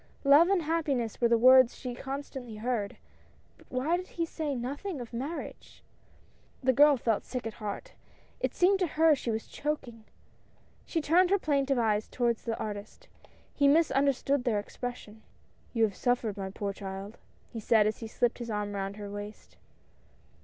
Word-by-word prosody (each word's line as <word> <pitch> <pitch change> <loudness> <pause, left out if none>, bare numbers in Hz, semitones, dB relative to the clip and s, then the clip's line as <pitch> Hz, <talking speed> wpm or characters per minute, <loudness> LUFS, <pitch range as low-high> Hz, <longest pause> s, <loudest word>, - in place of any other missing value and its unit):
Love 290 +5 +6
and 390 -4 +2
happiness 290 -9 -1
were 235 - +5
the 235 0 +4
words 255 +1 +7
she 250 -2 -6
constantly 265 -2 -6
heard, 215 -2 -2 0.6
but - - -22
why 265 +7 0
did 365 +1 -7
he 335 - -3
say 310 -3 -3
nothing 285 +8 -4
of 240 -1 -8
marriage? 275 +8 -6 0.8
The 260 0 +4
girl 290 +2 +6
felt 225 -3 0
sick 250 -2 -5
at 225 - -4
heart. 205 -1 -5 0.5
It - - -2
seemed 380 +2 +4
to 365 - +1
her 320 0 +6
she 260 -4 -3
was 220 0 -2
choking; 245 -7 -5 0.8
she 325 - -1
turned 350 +5 +4
her 400 - +4
plaintive 280 -5 +1
eyes 215 -2 +1
toward 240 -2 0
the 225 0 -4
artist; 210 - -7 0.4
he 285 - +3
misunderstood 280 -3 +2
their 235 -4 +1
expression. 220 0 -7 0.5
"You 230 -2 +1
have 205 -3 +1
suffered, 245 -4 0
my 195 -2 -5
poor 200 +1 -4
child!" 195 +2 -7 0.3
he 230 - -5
said 220 0 +4
as 215 0 -1
he 225 - -6
slipped 240 +2 0
his 235 -1 -6
arm 210 -1 -3
around 195 0 -3
her 205 -1 -7
waist. 205 +1 -9
245 Hz, 170 wpm, -29 LUFS, 220-285 Hz, 0.8 s, words